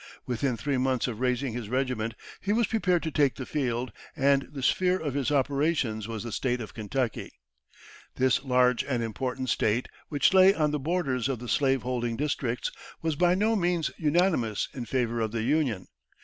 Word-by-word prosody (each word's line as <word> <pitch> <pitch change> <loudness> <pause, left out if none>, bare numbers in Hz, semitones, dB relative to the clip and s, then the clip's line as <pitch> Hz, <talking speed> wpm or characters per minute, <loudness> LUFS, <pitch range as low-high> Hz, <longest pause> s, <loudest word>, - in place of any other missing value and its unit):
Within 125 0 -1
three 135 +2 -1
months 130 -1 +1
of 115 -3 -5
raising 125 0 0
his 115 -3 -5
regiment, 125 -3 -1 0.3
he 200 - -1
was 235 +1 +3
prepared 185 -6 +1
to 160 - -2
take 140 -3 +2
the 130 - -6
field, 125 -5 -2 0.2
and 140 -2 +2
the 140 -3 -6
sphere 185 +6 +3
of 150 -6 -3
his 140 -1 0
operations 140 -6 0
was 115 -1 -5
the 120 - -5
State 125 +2 -1
of 110 - -7
Kentucky. 115 +2 -3 0.8
This 130 +1 +2
large 125 -2 +3
and 125 -4 -1
important 130 +3 -3
State, 115 +2 +1 0.2
which 145 +3 +3
lay 190 +1 +7
on 150 -2 +1
the 150 - -1
borders 140 -5 -1
of 135 - -1
the 120 +2 -8
slave 135 +2 +2
holding 120 -2 -2
districts, 135 -4 -1 0.3
was 160 -2 0
by 175 +3 +3
no 215 +4 +2
means 175 -4 0
unanimous 155 - +1
in 125 -3 -5
favour 120 -1 -1
of 110 -1 -1
the 115 -1 -1
Union. 130 - +1
130 Hz, 185 wpm, -28 LUFS, 120-150 Hz, 0.8 s, lay